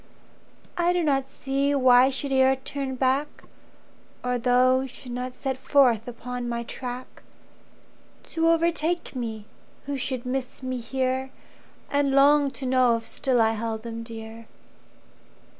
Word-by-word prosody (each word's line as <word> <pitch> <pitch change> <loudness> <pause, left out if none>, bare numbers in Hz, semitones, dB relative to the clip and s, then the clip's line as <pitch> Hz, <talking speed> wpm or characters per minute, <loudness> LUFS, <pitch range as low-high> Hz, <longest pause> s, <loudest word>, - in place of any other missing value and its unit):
I 350 +1 +3
do 355 -1 +1
not 270 -3 +1
see 280 +1 -1
why 255 -2 +6
I - - +2
should 275 +1 -4
e'er 265 0 +4
turn 265 0 -5
back, 265 +3 0 0.8
Or 250 0 0
those 255 +2 +3
should 255 0 -11
not 250 +1 -4
set 265 -2 -3
forth 260 -4 +3
upon 245 0 -5
my 235 0 -2
track 250 +1 -7 1.1
To 330 0 +2
overtake 335 -1 0
me, 225 -4 -4 0.4
who 280 0 -3
should 255 -1 -3
miss 260 +1 -4
me 255 -1 -3
here 260 +2 -2 0.6
And 285 -1 +2
long 285 +1 +5
to 265 0 -8
know 255 -2 +4
if 225 - -9
still 255 0 0
I 225 -1 +4
held 225 0 -3
them 230 -1 -6
dear. 225 0 -9
260 Hz, 140 wpm, -25 LUFS, 245-275 Hz, 1.1 s, why